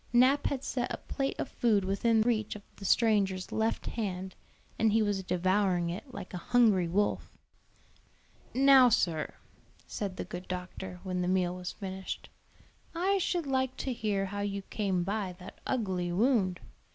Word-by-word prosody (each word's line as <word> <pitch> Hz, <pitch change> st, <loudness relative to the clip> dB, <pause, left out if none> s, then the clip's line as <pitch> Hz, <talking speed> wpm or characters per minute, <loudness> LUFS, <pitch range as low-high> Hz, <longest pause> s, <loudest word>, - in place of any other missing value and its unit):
Nap 255 Hz, +4 st, +4 dB
had 270 Hz, -2 st, -2 dB
set 245 Hz, -2 st, -2 dB
a -, -, -2 dB
plate 275 Hz, 0 st, -3 dB
of -, -, -2 dB
food 215 Hz, -6 st, +1 dB
within 220 Hz, +4 st, +2 dB
reach 220 Hz, -3 st, 0 dB
of 205 Hz, -, -9 dB
the 195 Hz, -, -9 dB
stranger's 195 Hz, -4 st, +2 dB
left 220 Hz, +1 st, 0 dB
hand, 190 Hz, -4 st, -3 dB, 0.5 s
and 220 Hz, -1 st, +4 dB
he 220 Hz, +1 st, +3 dB
was 205 Hz, -2 st, 0 dB
devouring 185 Hz, -1 st, +1 dB
it 205 Hz, +10 st, -7 dB
like 200 Hz, -6 st, -8 dB
a 180 Hz, -, -3 dB
hungry 215 Hz, -5 st, +3 dB
wolf. 205 Hz, +5 st, -1 dB, 1.2 s
"Now, 265 Hz, -1 st, +7 dB
sir," 165 Hz, -8 st, 0 dB, 0.5 s
said 195 Hz, -3 st, -4 dB
the -, -, -3 dB
good 180 Hz, +1 st, -7 dB
doctor, 180 Hz, 0 st, -6 dB
when 185 Hz, -2 st, -2 dB
the 180 Hz, -, 0 dB
meal 180 Hz, -1 st, +1 dB
was 180 Hz, 0 st, -5 dB
finished, 190 Hz, -2 st, -6 dB, 0.7 s
"I 385 Hz, +4 st, +2 dB
should 350 Hz, -2 st, 0 dB
like 260 Hz, -1 st, 0 dB
to 260 Hz, -, -2 dB
hear 205 Hz, -4 st, -1 dB
how 205 Hz, +1 st, -5 dB
you 200 Hz, -1 st, -2 dB
came 190 Hz, -4 st, 0 dB
by 195 Hz, -1 st, -2 dB
that 185 Hz, +1 st, -11 dB
ugly 185 Hz, -8 st, -1 dB
wound. 195 Hz, -3 st, +2 dB
200 Hz, 165 wpm, -30 LUFS, 185-235 Hz, 1.2 s, Now